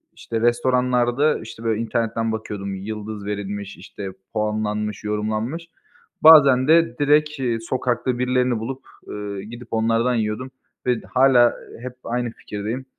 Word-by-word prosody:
işte 115 -1 -4
restoranlarda, 125 +3 +2
işte, 115 +1 -10
böyle 110 0 0
internetten 115 -1 -1
bakıyordum, 100 -3 -4
yıldız 105 +1 -6
verilmiş, 100 -1 -5
işte 100 +1 -8 0.2
puanlanmış, 105 -1 -2
yorumlanmış. 110 +10 -2 0.6
Bazen 140 -5 +8
de 160 -6 +4
direkt, 150 0 +3
iii, 120 -3 -1
sokakta 125 0 -1
birilerini 125 -2 +1
bulup, 130 +4 -5 0.3
eee, 100 -1 -5
gidip 120 +1 -10
onlardan 115 +2 +1
yiyordum 110 +4 -2 0.3
ve 125 -2 +1
d - - -16
hâlâ 130 -2 +5 0.3
hep 125 0 -6
aynı 120 0 -2
fikirdeyim. 110 +5 -5
115 Hz, 130 wpm, -22 LUFS, 105-125 Hz, 0.6 s, Bazen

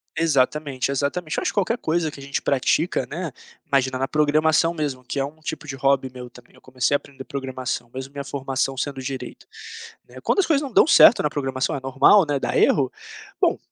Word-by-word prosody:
Exatamente, 140 -3 0
exatamente. 145 +4 -2
Eu - - 0
acho - - -1
que - - -21
qualquer 205 +3 +1
coisa 160 -3 -1
que 145 - -12
a - - -10
gente 140 -1 -2
pratica, 140 +5 +1
né, 165 0 -4 0.3
imagina, 130 -1 +1
na 135 +1 -1
programação 155 +2 +2
mesmo 145 -6 -3
que 125 +3 -4
é 135 - +1
um 150 +3 -11
tipo 155 0 -6
de 135 - -5
hobby 135 -1 +1
meu 125 -1 -9
também, 125 0 -18
eu 130 - -20
comecei 130 +2 -1
a - - +5
aprender 135 -1 -12
programação 130 -3 -5
mesmo 130 +1 -7
minha 140 0 -6
formação 135 0 -2
sendo 135 0 -3
direito, 130 0 -7 0.6
né, - - -13
quando - - +2
as 385 - +1
coisas 300 -4 +2
não 280 - -5
dão - - +5
certo 275 - +7
na 150 - 0
programação, 135 -3 -2
é 140 - -3
normal, 135 +9 +4
né, 145 -1 0
dar - - -2
erro, 135 -3 +3 0.5
bom, - - +2
140 Hz, 215 wpm, -23 LUFS, 130-155 Hz, 0.6 s, certo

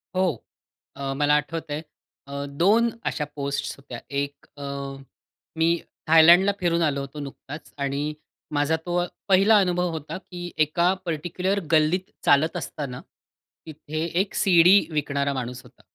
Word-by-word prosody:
हो. 180 -10 0 0.5
अ, 135 -1 -3
मला 145 +1 +3
आठवतंय 155 -1 -5 0.5
अ, 140 0 -4
2 225 +6 +4 0.2
अशा 150 - -1
पोस्ट्स 140 0 -3
होत्या 125 -4 -9 0.2
एक 140 0 -5
अ, 145 - -7 0.9
मी 165 0 +3 0.4
थायलंडला 170 +5 +7
फिरून 170 -1 +1
आलो 145 -3 +1
होतो 140 +2 -8
नुकताच 145 +1 -9
आणि 140 +1 -2 0.5
माझा 145 +2 +2
तो 175 0 0 0.3
पहिला 195 +3 +6
अनुभव 180 -1 +1
होता, 160 0 -5
की 175 -2 -8
एका 170 +4 +2
पर्टिक्युलर 175 +5 -1
गल्लीत 160 +4 +2 0.2
चालत 155 +3 +4
असताना, 130 -4 -5 0.6
तिथे 155 0 -5 0.2
एक 195 - -4
सीडी 180 +1 +6
विकणारा 140 -2 -1
माणूस 125 -1 -5
होता. - - -20
155 Hz, 130 wpm, -24 LUFS, 140-175 Hz, 0.9 s, थायलंडला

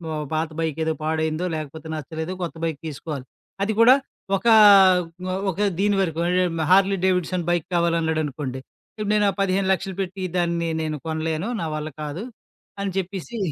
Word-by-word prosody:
ఆహ్, 150 -1 -3
పాత 160 +1 0
బైకేదో 160 0 -1
పాడైందో 160 +2 -1
లేకపోతే, 155 +1 -7
నచ్చలేదు 160 +4 -5
కొత్త 165 - -4
బైక్ 160 -3 -3
తీసుకోవాలి. 145 -2 -6 0.4
అది 215 +2 0
కూడా 250 +3 +8 0.4
ఒక, 235 - -4 0.8
ఒ - - -1 0.2
ఒక 185 - -11 0.2
దీని 205 0 +2
వరకు. 165 -3 -1
అంటే 180 +1 +2 0.3
హార్లీ 195 +1 +5
డేవిడ్సన్ 180 -1 0
బైక్ 175 -3 0
కావాలన్నాడనుకోండి, 155 -6 0 0.4
ఇప్పుడు 210 -1 -2
నేను 210 -1 +3
ఆ - - +1
1500000 190 0 0
పెట్టి 190 0 -4
దాన్ని 170 -1 0
నేను 155 -1 -2
కొనలేను. 160 +4 -2
నా 165 - -2
వల్ల 155 0 -4
కాదు 150 +8 -5 0.6
అని 200 - -2
చెప్పేసి 195 +5 -4
165 Hz, 150 wpm, -23 LUFS, 155-190 Hz, 0.8 s, కూడా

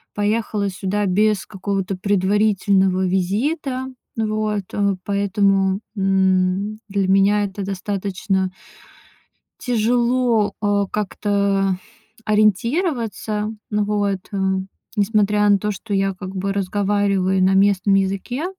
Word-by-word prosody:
поехала 210 -1 0
сюда 195 +2 -2
без 205 +2 +2
какого-то 195 -1 -3
предварительного 195 -1 +2
визита. 255 - -1 0.3
Вот. 215 -2 -1 0.4
Поэтому, 195 -1 +1 0.2
м, 190 +1 +1
для 195 -1 0
меня 195 +2 +4
это 200 0 -5
достаточно 195 -1 -2 1.1
тяжело, 240 -2 +1
а, 205 -1 +2
как-то 200 -1 0 0.5
ориентироваться. 215 - 0 0.2
Ну 210 -1 +1
вот, 205 -2 0
э, 200 - -3 0.6
несмотря 210 0 +2
на 200 - +5
то, 210 +2 -2
что 205 +2 -6
я 195 0 +1
как 185 +1 -8
бы 195 +1 -2
разговариваю 195 -1 +1
на 190 +1 +4
местном 195 0 +3
языке. 195 - -1
200 Hz, 100 wpm, -21 LUFS, 195-210 Hz, 1.1 s, на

